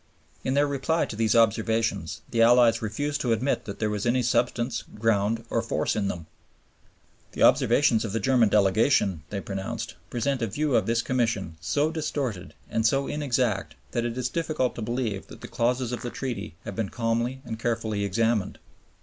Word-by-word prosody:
In 130 - 0
their 145 +1 +4
reply 145 +4 0
to - - -7
these 110 0 +2
observations 110 -5 +1
the 115 - +2
Allies 120 0 +5
refused 140 +7 -2
to 120 -3 +2
admit 130 +5 -1
that 100 - -6
there 110 -1 -1
was 105 +2 -2
any 125 +1 +2
substance, 120 0 0 0.2
ground, 110 +1 +1
or 115 - +2
force 115 - -1
in 105 -2 0
them. 85 -4 -4 1.1
"The - - 0
observations 120 -1 +4
of 110 - -3
the 115 - -1
German 120 0 +3
Delegation," 100 - +3
they 100 - -3
pronounced, 110 +5 -4 0.2
"present 125 +2 -1
a 115 - +1
view 145 +6 0
of - - +2
this 115 0 +1
Commission 115 -9 -1
so 145 - +1
distorted 145 - -3
and 110 - -1
so 135 +5 +2
inexact 125 -8 -1 0.2
that 120 - -1
it 120 0 -3
is 125 -1 0
difficult 155 -5 -1
to - - -7
believe 115 -3 -2
that - - -13
the - - -7
clauses 125 +1 0
of 120 - -4
the 120 - -4
Treaty 120 - -5
have - - -5
been 110 -4 -2
calmly 120 +3 -1
or 115 - -3
carefully 110 -3 -1
examined. 110 +1 0
115 Hz, 185 wpm, -26 LUFS, 110-125 Hz, 1.1 s, Allies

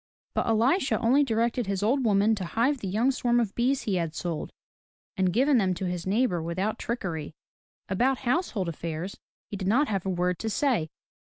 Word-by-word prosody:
But - - 0
Elisha 240 - +2
only 260 +5 +4
directed 230 -2 0
his 195 0 -1
old 260 +5 +2
woman 210 0 +3
to 205 -3 -3
hive 240 +10 0
the 200 - -5
young 220 +8 +2
swarm 240 -2 +1
of 220 -4 -1
bees 255 +3 +1
he 195 -4 0
had 165 -2 -2
sold, 170 -3 -4 0.6
and 190 -3 +1
given 265 +5 +3
them 185 -3 +1
to 190 - -4
his 180 0 -3
neighbor 200 -4 +1
without 185 +7 -2
trickery. 165 -10 -4 0.5
About 250 +8 +1
household 245 - 0
affairs 165 +3 -5 0.3
he 205 - -3
did 190 -1 -3
not 265 +9 +3
have 195 -4 -1
a 195 - -2
word 180 -1 0
to 225 - -2
say. 225 - +1
210 Hz, 190 wpm, -27 LUFS, 180-245 Hz, 0.6 s, only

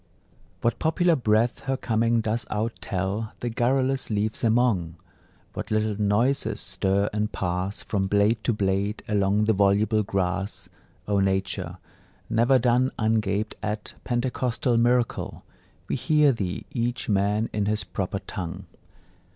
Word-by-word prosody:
What 115 - 0
popular 170 +1 +3
breath 115 -2 +2
her 135 0 0
coming 115 -1 +1
does 110 0 -1
out 110 +2 -1
tell 100 +4 -2
The 120 - -2
garrulous 130 +3 +1
leaves 110 +2 -1
among! 110 -8 +2 0.6
What - - -5
little 110 -1 0
noises 110 +2 +1
stir 100 +1 0
and 105 0 -1
pass 90 +2 -2
From 95 -2 -1
blade 105 +3 +2
to - - +3
blade 100 0 -1
along 105 0 +2
the 110 - +3
voluble 105 +2 +3
grass! 95 0 -2 0.4
O 100 -1 +2
Nature, 95 -2 -1 0.5
never 120 +4 +4
done 125 +1 +2
Ungaped 110 -1 0
at 105 0 -3
Pentecostal 120 -1 0
miracle, 120 +1 +1 0.4
We - - -1
hear 150 -2 +4
thee, 100 -7 -3
each 120 0 -2
man 105 +2 +1
in 105 -1 0
his 105 -1 0
proper 95 +1 -3
tongue! 90 -1 -6
110 Hz, 135 wpm, -25 LUFS, 100-120 Hz, 0.6 s, never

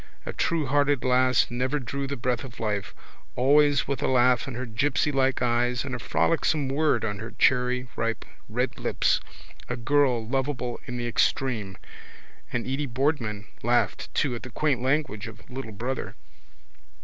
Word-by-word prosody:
A - - -4
truerhearted 145 -4 +1
lass 130 0 +3
never 130 +4 0
drew 140 +1 -4
the 140 - -4
breath 125 +1 -1
of 130 -3 -10
life, 105 -2 -2 0.4
always 145 +2 +4
with 140 0 -2
a - - +1
laugh 125 0 +3
in 130 - -5
her 125 +1 -3
gipsylike 135 +2 +1
eyes 120 +1 +1
and 130 - -4
a 125 - -3
frolicsome 155 0 +1
word 140 -5 +2
on 105 -2 -3
her 110 +2 -8
cherryripe 125 -3 +1 0.2
red - - -1
lips, - - +2 0.5
a 125 - -2
girl 125 -2 +2
lovable 130 -1 -2
in 125 - -4
the 120 0 -2
extreme. 115 -5 0 0.7
And 120 -2 -2
Edy 135 +2 -2
Boardman 120 -5 -1 0.2
laughed 120 +1 +1
too 140 -4 +1
at 120 - -5
the 125 - -8
quaint 135 +1 0
language 130 -6 0
of 115 +1 -12
little 125 -3 -6
brother. 120 +6 -4
125 Hz, 155 wpm, -26 LUFS, 120-140 Hz, 0.7 s, always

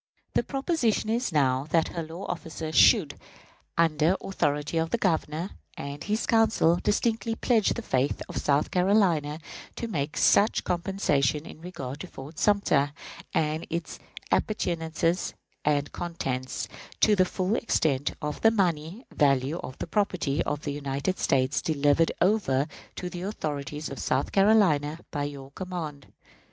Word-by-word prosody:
The - - +3
proposition 270 - 0 0.2
now 135 -3 +2
is, - - -17
that 165 0 +2
her 170 - -4
law 165 +4 -7
officer 160 -2 -5
should, - - +5 0.6
under 165 +2 +3
authority 150 -3 -1
of 160 0 0
the 235 - +1
Governor 165 -2 -1 0.3
and 140 +1 -6
his 215 +2 -1
Council, 225 -7 +3
distinctly 225 +3 0
pledge 225 -3 +2
the 235 - -5
faith 135 -6 0
of - - -6
South 145 +1 +1
Carolina 180 -6 +2 0.4
to 235 - -4
make 150 -8 -3
such 210 +3 +4
compensation 155 - 0
in 155 - -11
regard 150 -6 -6
to 185 - -6
Fort 150 0 -10
Sumter, 150 -9 +2 0.4
and 155 0 0
its 170 0 -4 0.3
appurtenances 170 -3 0 0.3
and 145 -1 +1
contents, 130 -7 -3 0.3
to 215 - +6
the 185 - +5
full 185 +3 -1
extent 145 - +1
of 150 -1 -3
the 225 - +7
money 180 - -1
value 140 +2 +2
of 130 - -8
the - - -4
property 170 -6 0
of 145 0 -2
the 145 - -2
United 140 +5 -2
States 130 -1 +2
delivered 145 +1 +2
over 180 -9 +2 0.3
to 180 - -4
the 180 0 -6
authorities 150 -6 -4
of 140 - -7
South 130 +2 0
Carolina 190 -8 +4
by 145 -2 -2
your 140 -2 -7
command. 160 -5 -6
160 Hz, 145 wpm, -27 LUFS, 145-190 Hz, 0.6 s, the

